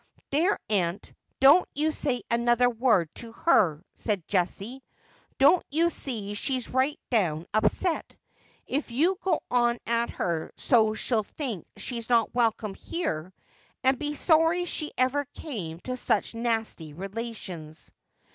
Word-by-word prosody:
' - - -39
There, 335 +9 +2
aunt, 185 -3 0 0.3
don't 280 +7 +6
you 305 +2 +1
say 265 -5 -1
another 240 +1 +3
word 225 - +2
to 230 -1 -8
her,' 180 - +3
said 205 -7 -2
Jessie. 200 +7 -1 0.3
' - - -34
Don't 290 +6 +5
you 335 +4 +2
see 215 -10 -3
she's 255 +4 -2
right 260 +3 +1
down 170 -8 +1
upset? 325 - 0 0.5
If 285 +1 -2
you 335 +11 +1
go 365 -4 +1
on 240 -1 +3
at 235 0 +1
her 165 -2 -2
so 220 -4 +3
she'll 225 0 +1
think 220 - -5
she's 235 -2 -4
not 235 -2 +3
welcome 225 -3 +1
here, 190 - -4 0.5
and 260 0 +3
be 295 0 -2
sorry 325 +3 +3
she 310 -3 -3
ever 260 +3 +2
came 180 - -6
to 255 - -4
such 250 - 0
nasty 225 -9 -2
relations.' 190 -4 -7
235 Hz, 140 wpm, -27 LUFS, 205-280 Hz, 0.5 s, don't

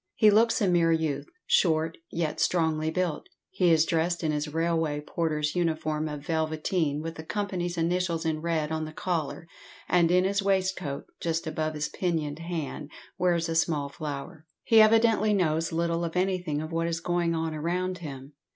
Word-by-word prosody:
He 215 -2 +6
looks 225 +3 +4
a - - +3
mere 170 -2 +3
youth, 160 -3 0 0.2
short, 160 -2 +2 0.2
yet 165 -2 -2
strongly 160 -2 +1
built. 175 -1 -2 0.2
He 180 -2 +3
is 160 -1 +5
dressed 170 +1 0
in 155 - +1
his 150 0 -2
railway 160 -2 0
porter's 150 0 -2
uniform 155 -3 0
of 145 -1 -7
velveteen, 155 -1 -1
with 165 0 -5
the 160 - -7
company's 180 -2 -3
initials 170 0 0
in 155 -1 -1
red 160 -2 -1
on 160 0 -1
the 155 - -8
collar, 165 -3 -3 0.4
and 170 -2 +3
in 180 +1 +4
his 200 +1 +1
waistcoat, 190 -7 -1
just 165 0 -1
above 155 0 -2
his 150 0 -1
pinioned 160 -5 -2
hand, 160 -3 -5 0.3
wears 175 -2 +2
a 165 - -2
small 155 -3 +1
flower. 150 +2 -7 0.2
He 225 -1 +6
evidently 215 -1 +4
knows 165 -3 +1
little 170 +1 0
of 165 0 -4
anything 180 -5 0
of 155 - -7
what 165 0 0
is 165 -1 -1
going 170 0 0
on 160 -1 -2
around 180 +4 -2
him. 140 -3 -8
165 Hz, 175 wpm, -27 LUFS, 155-180 Hz, 0.4 s, He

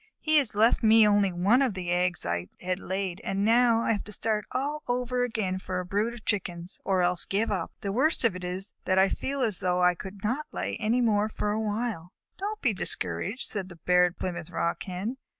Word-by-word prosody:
He 310 -1 +4
has 255 -7 -2
left 220 +3 +4
me 220 -1 +6
only 205 -2 +3
one 195 +9 +3
of 255 -7 +1
the 180 -2 -3
eggs 180 - +1
I 85 +1 -2
had 185 +1 -2
laid, 190 -1 -3
and 195 +1 -1
now 230 0 +4
I - - +1
have 205 -3 -1
to 210 - -8
start 215 0 -1
all 290 +3 -2
over 245 0 0 0.3
for 185 -1 -3
a 180 - -4
brood 210 +6 -1
of 230 - -13
Chickens, 175 -3 -3
or 185 -2 +2
else 175 0 +2
give 210 +3 0
up. 185 -5 -2
The 200 - -2
worst 270 +9 +1
of 225 -6 +2
it 185 - -7
is 185 +3 -5
that 185 - +2
I 190 +1 +5
feel 275 -1 -2
as 215 -6 0
though 180 0 +1
I 180 0 +5
could 190 +3 -9
not 255 +8 -1
lay - - -3
any 225 +3 +1
more 215 -2 +2
for 210 -1 -2
a 215 +1 -1
while." 210 -5 -3 0.3
"Don't 420 +2 -4
be 245 -5 +3
discouraged," 200 +4 -1
said 195 -3 -3
the 175 - -11
Barred 180 +1 +2
Plymouth 175 -3 -4
Rock 170 - -1
Hen. 195 +7 -4
205 Hz, 220 wpm, -28 LUFS, 180-230 Hz, 0.3 s, me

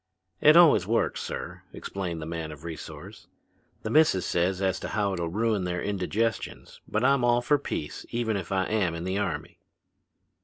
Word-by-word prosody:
"It 155 +2 +7
always 150 - +6
works, 115 +2 +1
sir," - - -6
explained 85 -5 -5
the - - -5
man 80 -1 -4
of 75 0 -11
resource. 85 -2 -9 0.6
"The - - -3
missus 150 - +4
says 90 +2 +1
as 95 -1 0
how 100 -2 -1
it'll 85 -2 -2
ruin 110 +1 0
their 90 0 -2
indigestions, 105 +3 -2
but 110 +3 -1
I'm 135 -1 +4
all 120 0 +3
for 145 +3 +3
peace 75 - -5
even 115 -2 -1
if 95 -4 -4
I 95 -1 +2
am 95 -6 0
in 85 - -5
the 95 +2 -1
army." 85 -7 -4
95 Hz, 175 wpm, -27 LUFS, 85-115 Hz, 0.6 s, It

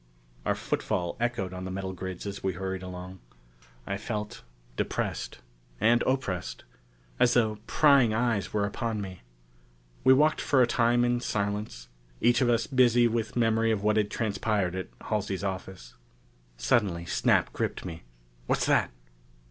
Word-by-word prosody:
Our - - +2
footfall 85 -1 -2
echoed 120 -6 -1
on 90 0 -6
the 95 - -5
metal 95 0 -4
grids 95 +1 -6
as 100 0 -5
we 95 -1 -1
hurried 95 +1 -4
along. 90 0 -8 0.7
I 100 - -2
felt 105 -1 -4 0.3
depressed - - -3 0.4
and 120 +1 +4
oppressed. 90 - -2 0.6
As 120 - +4
though 110 -3 +2
prying 140 -6 +5
eyes 115 -2 0
were 105 -1 +1
upon 110 +1 -2
me. 95 -3 -7 0.8
We 130 - +7
walked 155 +3 +3
for 130 -3 +4
a - - +5
time 120 0 +2
in 120 0 +1
silence, 100 - -3 0.3
each 120 +1 +3
of 125 - +3
us 115 -1 +2
busy 120 -2 +4
with 115 -1 -2
memory 115 -1 +2
of 105 -3 0
what 105 0 +3
had 105 -1 +2
transpired 105 -4 -1
at 95 0 -4
Halsey's 100 -3 -2
office. 95 -10 -5 0.6
Suddenly 85 - +1
Snap - - +2
gripped - - -3
me. 85 -3 -6 0.5
"What's - - +1
that?" - - +3
105 Hz, 150 wpm, -28 LUFS, 95-120 Hz, 0.8 s, We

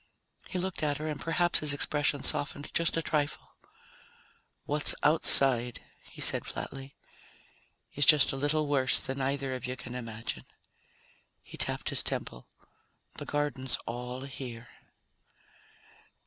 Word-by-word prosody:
He - - -5
looked 185 0 -4
at 145 -2 0
her 155 +1 -5
and 150 -2 -5
perhaps 175 +1 +4
his 150 -2 +6
expression 145 -1 +3
softened 145 0 -2
just 170 -1 +2
a 165 - -1
trifle. 150 -2 -2 1.1
"What's 150 +1 +1
outside," 135 -5 +4 0.3
he - - -15
said - - +1
flatly, 135 0 -7 1.0
"is 145 - +2
just 150 -3 +7
a - - -5
little 145 +3 0
worse 135 -2 +2
than 135 +1 -4
either 135 0 -2
of 125 -1 -5
you 130 +1 -5
can 125 0 -8
imagine." 115 -3 -6 1.0
He - - -13
tapped - - -3
his - - +5
temple. 60 - -5 0.7
"The - - -6
garden's 145 -3 -2
all 125 +2 -6
here." 125 -4 -8
140 Hz, 135 wpm, -29 LUFS, 130-150 Hz, 1.1 s, just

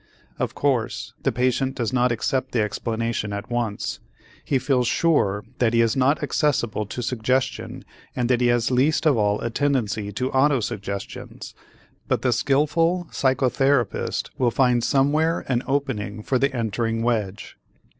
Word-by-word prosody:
Of - - -2
course, 130 -6 -1
the - - +1
patient 130 +2 0
does 120 0 -2
not 125 -1 +3
accept 130 +3 -1
the 115 -3 +2
explanation 110 0 -2
at 100 +3 -6
once. 120 -4 -2 0.4
He 135 - +1
feels 125 -2 +1
sure 105 -13 +2 0.2
that 120 -2 +2
he 115 - +5
is 115 -1 +2
not 135 +3 +2
accessible 120 -8 0
to 125 +4 -5
suggestion 125 +3 -1 0.3
and 125 -2 0
that 125 -1 +2
he 120 - +4
has 120 0 +2
least 135 +6 +2
of 150 -3 +5
all 105 -1 +1
a 120 - -2
tendency 115 -7 0
to 125 +6 -2
autosuggestions, 120 -8 -2 0.5
but - - 0
the 125 -2 +3
skillful 165 +7 +1
psychotherapist 130 -2 +1
will 125 - +3
find 125 -1 +2
somewhere 150 +6 +2
an 125 -2 +1
opening 125 -7 -2
for 130 +2 +1
the 140 0 +2
entering 115 -1 -1
wedge. 110 -5 -2
125 Hz, 150 wpm, -23 LUFS, 115-135 Hz, 0.5 s, he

